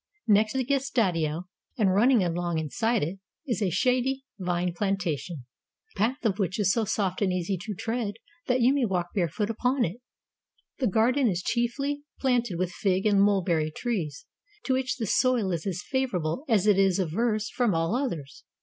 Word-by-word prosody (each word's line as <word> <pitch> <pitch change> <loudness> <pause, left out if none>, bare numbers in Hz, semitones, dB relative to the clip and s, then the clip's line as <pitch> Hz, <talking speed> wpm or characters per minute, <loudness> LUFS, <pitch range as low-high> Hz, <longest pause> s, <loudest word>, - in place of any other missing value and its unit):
Next 215 0 +4
the 265 -1 0
gestatio, 195 - 0 0.3
and 200 -5 +3
running 230 +2 +4
along 175 -1 -1
inside 220 - 0
it, 175 +6 -4 0.3
is 235 -6 -2
a 195 - +2
shady 255 +8 +1 0.2
vine 180 -1 -1
plantation, 175 - -2 0.5
the - - -13
path 245 +5 0
of 205 -2 +1
which 190 0 -1
is 195 -2 +3
so 230 -2 0
soft 195 -2 -1
and 195 -2 +2
easy 180 +1 -1
to 210 +4 -5
the - - -18
tread 225 -3 -2 0.3
that 250 0 +2
you 250 +3 +5
may 280 -2 +1
walk 180 -5 0
barefoot 200 +4 0
upon 250 +3 +1
it. 180 +5 -5 0.8
The 260 - +2
garden 240 +6 +3
is 180 -1 -2
chiefly 275 +6 -1 0.2
planted 240 -8 +1
with 180 0 -1
fig 190 +1 0
and 200 -2 +4
mulberry 180 -6 +2
trees, 165 - -3 0.4
to 265 - 0
which 260 0 -1
this 225 -6 0
soil 245 -7 +2
is 170 +1 -3
as 180 -2 -3
favorable 250 - -1
as 210 -4 +3
it 205 -2 +4
is 195 -1 +3
averse 215 +5 0
from 235 -8 +1
all 165 +6 +1
others. 170 - -4
205 Hz, 180 wpm, -27 LUFS, 180-240 Hz, 0.8 s, you